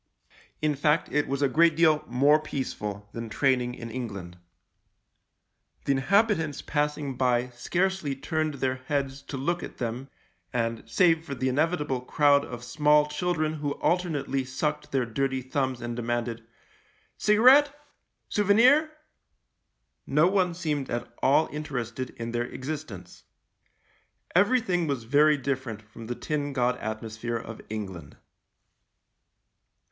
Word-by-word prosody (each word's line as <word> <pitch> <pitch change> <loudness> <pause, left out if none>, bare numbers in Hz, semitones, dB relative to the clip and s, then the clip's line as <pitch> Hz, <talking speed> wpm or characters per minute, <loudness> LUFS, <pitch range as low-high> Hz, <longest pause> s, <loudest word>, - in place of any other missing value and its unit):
In 155 -1 +3
fact, 150 +2 +1
it 150 0 +1
was 140 +1 -1
a - - +5
great 165 +4 +4
deal 155 -2 +4
more 140 +5 +4
peaceful 105 -9 -5
than 115 -1 -5
training 125 +1 +1
in 115 -2 -8
England. 100 -8 -6 1.5
The - - +2
inhabitants 160 - +2
passing 150 -2 -1
by 125 -1 +1
scarcely 170 +5 -1
turned 155 +2 -2
their 130 -1 -1
heads 140 -2 -1
to 140 0 -7
look 170 +6 -1
at - - -8
them 125 +3 -4 0.2
— - - -44
and, 115 -2 -1
save 165 -4 +3
for 140 -4 -6
the 130 0 0
inevitable 150 -2 0
crowd 145 +2 +3
of 120 -3 -8
small 150 +2 +3
children 155 0 -1
who 145 -2 -2
alternately 145 -7 0
sucked 130 +4 -3
their 135 -2 +1
dirty 130 +2 -1
thumbs 130 -1 -2
and 120 0 -4
demanded, 120 -1 -3 0.4
" - - -37
Cigarette, 255 +7 +7 0.6
sou 210 - 0
venir," 250 +10 +5 1.2
no 150 +4 +4
one 185 -2 +2
seemed 150 -6 -2
at 120 - -4
all 145 +4 +4
interested 130 -4 -4
in 115 0 -4
their 120 0 -1
existence. 130 - -7 1.1
Everything 190 -3 +2
was 140 -5 -2
very 145 +5 +4
different 130 -5 -3
from 110 +1 -12
the 120 - -3
tin 145 0 -3
god 125 -1 +1
atmosphere 110 +1 -4
of 115 -1 -8
England. 95 -9 -6
140 Hz, 135 wpm, -27 LUFS, 120-155 Hz, 1.5 s, Cigarette